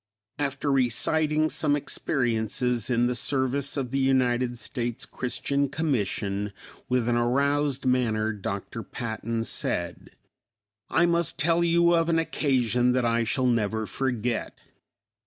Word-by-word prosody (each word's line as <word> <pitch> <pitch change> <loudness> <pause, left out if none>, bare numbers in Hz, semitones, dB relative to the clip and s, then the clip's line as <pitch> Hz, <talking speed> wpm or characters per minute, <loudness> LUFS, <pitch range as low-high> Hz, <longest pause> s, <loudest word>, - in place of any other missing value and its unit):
After 140 0 -1
reciting 150 +5 +2
some 145 -2 +1
experiences 120 -4 -1
in 120 -1 +2
the 125 - +1
service 130 +3 0
of 130 -3 -2
the 135 - 0
United 125 -2 +2
States 120 -1 -4
Christian 140 +2 -2
Commission, 105 -9 -1 0.4
with 125 -2 +1
an 120 - +2
aroused 140 +3 +1
manner, 110 -4 +1
Dr. 100 +2 -5
Patton 115 0 -4
said, - - -3 0.8
"I 170 - +3
must 170 -1 +1
tell 170 +2 +3
you 170 0 +4
of 165 0 +2
an 165 - +3
occasion 125 -6 +1
that 125 -1 +1
I 115 0 +2
shall 130 +3 0
never 110 -2 +1
forget. 120 +1 -2
125 Hz, 125 wpm, -26 LUFS, 115-140 Hz, 0.8 s, you